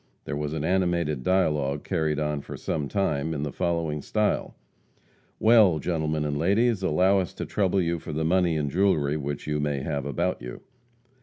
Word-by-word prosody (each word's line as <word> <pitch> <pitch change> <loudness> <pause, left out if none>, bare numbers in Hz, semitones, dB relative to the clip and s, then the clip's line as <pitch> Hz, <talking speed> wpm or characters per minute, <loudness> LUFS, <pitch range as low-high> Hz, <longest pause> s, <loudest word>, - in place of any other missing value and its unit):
There 75 - -3
was 75 0 -3
an 80 -2 -3
animated 85 -5 0
dialogue 75 -5 +1
carried 80 -5 -1
on 75 -1 -1
for - - -8
a 75 -3 -3
time, 80 -4 -1
in 70 - -3
the 75 - -3
following 85 -4 -1
style: 105 +7 -1 0.8
"Well, 110 -7 +5
gentlemen 80 -1 -1
and 75 -1 -2
ladies, 100 +5 +2
allow 95 +3 +3
us 90 - -4
to - - -4
trouble 100 -2 +1
you 85 -1 0
for 80 - -7
the 80 +1 -1
money 90 -1 +2
and 75 -2 -1
jewelry 80 -6 +2
which 70 -1 -4
you 75 0 -1
may 75 -2 -1
have 70 -1 -3
about 85 +3 -1
you." - - -8
80 Hz, 180 wpm, -26 LUFS, 75-90 Hz, 0.8 s, Well